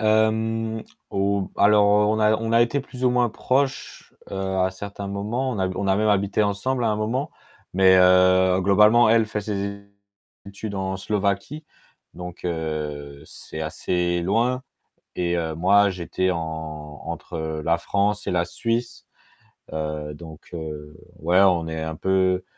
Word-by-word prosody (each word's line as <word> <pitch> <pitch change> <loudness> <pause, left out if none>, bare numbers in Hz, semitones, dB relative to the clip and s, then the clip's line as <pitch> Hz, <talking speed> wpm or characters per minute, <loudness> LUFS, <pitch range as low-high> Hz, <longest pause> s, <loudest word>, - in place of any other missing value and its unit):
Hem, 110 +1 +1 0.3
ou 100 0 -1
alors 105 0 +5 0.2
on 110 - 0
a 110 0 +4
on 115 +1 -2
a 115 - +5
été 120 +4 0
plus 130 -1 -7
ou 125 - +4
moins 125 -1 +2
proches, 135 +4 -2 0.2
heu, - - -5 0.2
à 95 0 +2
certains 100 +1 -7
moments, 105 +7 -2
on 105 - -4
a 95 - +1
on 100 +1 -2
a 95 - +3
même 110 0 +1
habité 100 +1 +2
ensemble 105 +6 -1
à 115 - +2
un 105 - 0
moment, 125 +8 -2 0.4
mais 95 0 +6
heu, 90 0 +5
globalement 105 +5 +5
elle 115 0 +4
fait 110 -1 -3
ses 100 -1 -4 0.6
études 100 +1 -7
en 95 0 -2
Slovaquie, 100 +9 -2 0.5
donc 90 0 -9
heu, 75 -4 -4
c'est 80 - -10
assez 85 +2 -1
loin. 120 +7 +1 0.5
Et 85 -1 0
heu, 80 -2 -2
moi, 100 +4 +4
j'étais 95 0 -2
en 80 -3 -6
entre, - - -7
heu, 80 -1 -3
la 85 +1 +2
France 100 +1 -1
et - - 0
la 85 -1 +1
Suisse, 115 +6 -3 0.7
heu, 75 -1 -4
donc, 80 0 -12
heu, 75 -2 -7 0.2
ouais, 90 +4 +3
on 90 -4 +3
est 80 0 -4
un 80 0 -4
peu 95 +1 +1
100 Hz, 160 wpm, -23 LUFS, 85-110 Hz, 0.7 s, mais